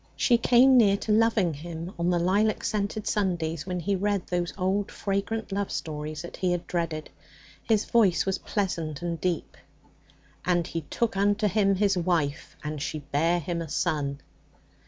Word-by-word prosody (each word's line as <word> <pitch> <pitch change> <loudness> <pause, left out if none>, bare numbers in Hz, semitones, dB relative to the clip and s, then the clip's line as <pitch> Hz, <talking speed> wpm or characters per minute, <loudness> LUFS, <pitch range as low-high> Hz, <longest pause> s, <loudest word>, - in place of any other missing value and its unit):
She 240 -2 +3
came 255 +3 +6
near 200 -4 +5
to 215 - -3
loving 215 -5 +3
him 165 +4 -7
on 170 +1 +1
the 175 - +2
lilac 200 +5 +2
scented 210 0 -2
Sundays 170 -6 -1
when 180 -1 -2
he 195 +4 0
read 200 0 0
those 175 -1 -1
old 195 +2 0
fragrant 200 +2 -2
love 200 0 -1
stories 150 0 -4
that 175 - -8
he 185 -1 0
had 175 - -3
dreaded. 165 -3 -3 0.5
His 215 -2 +1
voice 205 -7 +3
was 190 -1 -1
pleasant 165 -7 -2
and 170 -2 -3
deep. 180 -3 -2 0.9
'"And 175 -2 +1
he 165 - -4
took 230 -3 -1
unto 205 +2 +2
him 195 0 +2
his 200 0 +2
wife, 165 -5 -1
and 150 -1 -4
she 155 +1 -3
bare 150 +4 +1
him 170 +1 -3
a 165 - -6
son."' 140 -1 -1
180 Hz, 170 wpm, -27 LUFS, 165-205 Hz, 0.9 s, came